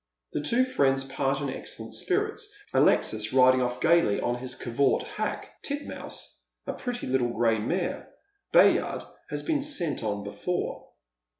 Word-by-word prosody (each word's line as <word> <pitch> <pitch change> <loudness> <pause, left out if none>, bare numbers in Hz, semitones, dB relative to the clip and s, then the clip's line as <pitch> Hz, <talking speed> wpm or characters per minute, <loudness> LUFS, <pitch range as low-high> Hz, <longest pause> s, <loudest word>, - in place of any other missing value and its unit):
The - - -1
two 240 +10 +3
fiiends 135 - +2
part 135 +1 -1
in 140 - -2
excellent - - -6
spirits, 420 +2 -1 0.2
Alexis 110 +1 +3
riding 130 0 +6
off 125 0 -1
gaily 170 -9 +4
on 120 - 0
his 125 0 -4
covert 130 +2 +1
hack, - - -5
Titmouse, 285 0 -5 0.3
a - - -3
pretty 245 -1 -4
little 130 -2 +1
gray 115 -1 +2
mare. 170 - -2 0.4
Bayard - - +4 0.3
has - - -2
been 310 -4 +1
sent 200 - -1
on 105 -2 -2
before. 175 - -3
135 Hz, 140 wpm, -27 LUFS, -, 0.4 s, riding